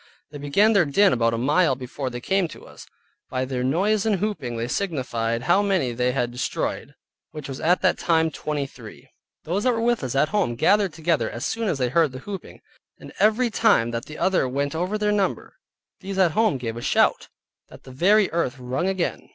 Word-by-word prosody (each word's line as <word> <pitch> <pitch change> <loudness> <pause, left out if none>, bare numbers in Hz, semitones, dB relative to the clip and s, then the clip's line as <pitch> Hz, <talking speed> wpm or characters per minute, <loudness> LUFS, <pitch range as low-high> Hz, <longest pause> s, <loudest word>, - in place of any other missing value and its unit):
They 145 - -8
began 195 +11 +3
their 200 -4 +5
din 190 +7 +3
about 115 -1 +1
a - - -3
mile 145 +4 +2
before 130 +1 -5
they 120 -1 -6
came 190 +4 +1
to - - -13
us. - - -14 0.4
By 130 -1 -2
their 130 -1 -3
noise 195 +10 +1
and 220 -2 +2
hooping 170 - -3
they 115 +1 -2
signified 120 -9 -2
how 175 +6 +3
many 190 -11 0
they 125 +1 0
had 125 -2 -1
destroyed 125 +1 -3 0.3
(which 150 -3 -8
was 135 -1 -6
at 175 +4 +2
that 185 - +2
time 160 -1 +2
twenty 150 -2 -3
three). 115 -5 -13 0.3
Those 185 +6 -2
that 255 - +3
were 225 - -2
with 240 -6 +1
us 130 0 -3
at 150 +3 +2
home 205 -9 +1
were 120 - -4
gathered 195 - +2
together 155 -8 0
as 120 - -5
soon 225 -1 -2
as 170 - 0
they 125 -2 0
heard 155 0 +2
the - - -6
hooping, 200 -2 -8 0.4
and - - -12
every 225 +3 +3
time 205 - +3
that 115 0 -4
the 155 - -10
other 185 -9 +1
went 140 +2 -2
over 180 +6 -2
their 210 0 0
number, 200 -2 -2 0.4
these 195 0 -6
at 185 -3 +4
home 215 -4 +2
gave 115 -2 -5
a - - -6
shout, - - +2 0.4
that - - -15
the 130 - -12
very 195 +9 +3
earth 160 -6 -1
rung 130 +8 -2
again. 190 -2 -2
155 Hz, 215 wpm, -23 LUFS, 125-195 Hz, 0.4 s, their